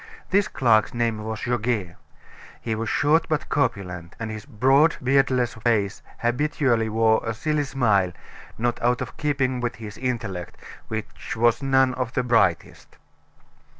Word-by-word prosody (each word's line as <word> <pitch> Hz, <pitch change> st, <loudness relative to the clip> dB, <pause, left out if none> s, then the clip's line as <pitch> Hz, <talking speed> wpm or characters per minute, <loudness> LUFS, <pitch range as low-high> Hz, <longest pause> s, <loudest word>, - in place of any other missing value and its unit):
This 200 Hz, +1 st, +3 dB
clerk's 115 Hz, -3 st, +2 dB
name 115 Hz, -2 st, 0 dB
was 110 Hz, 0 st, -5 dB
Goguet. 115 Hz, -7 st, -1 dB, 0.6 s
He 115 Hz, -, -3 dB
was 115 Hz, +1 st, -3 dB
short 150 Hz, +3 st, +2 dB
but 155 Hz, -1 st, -1 dB
corpulent, 90 Hz, -10 st, -2 dB
and 110 Hz, -1 st, -4 dB
his 110 Hz, +4 st, -8 dB
broad, 135 Hz, +6 st, +3 dB
beardless 130 Hz, -2 st, +2 dB
face 110 Hz, -3 st, 0 dB, 0.2 s
habitually 120 Hz, -2 st, +1 dB
wore 110 Hz, 0 st, +3 dB
a 115 Hz, -1 st, -3 dB
silly 150 Hz, +4 st, -1 dB
smile, 110 Hz, -9 st, +2 dB, 0.5 s
not 120 Hz, +1 st, -1 dB
out 120 Hz, +1 st, +1 dB
of 125 Hz, -, -5 dB
keeping 135 Hz, -4 st, 0 dB
with 120 Hz, -1 st, -2 dB
his 105 Hz, -2 st, -9 dB
intellect, 110 Hz, -9 st, -4 dB, 0.3 s
which 110 Hz, 0 st, -5 dB
was 120 Hz, +2 st, +2 dB
none 135 Hz, -1 st, +3 dB
of 125 Hz, -1 st, -3 dB
the 125 Hz, -, 0 dB
brightest. 115 Hz, -8 st, 0 dB
120 Hz, 145 wpm, -24 LUFS, 110-130 Hz, 0.6 s, This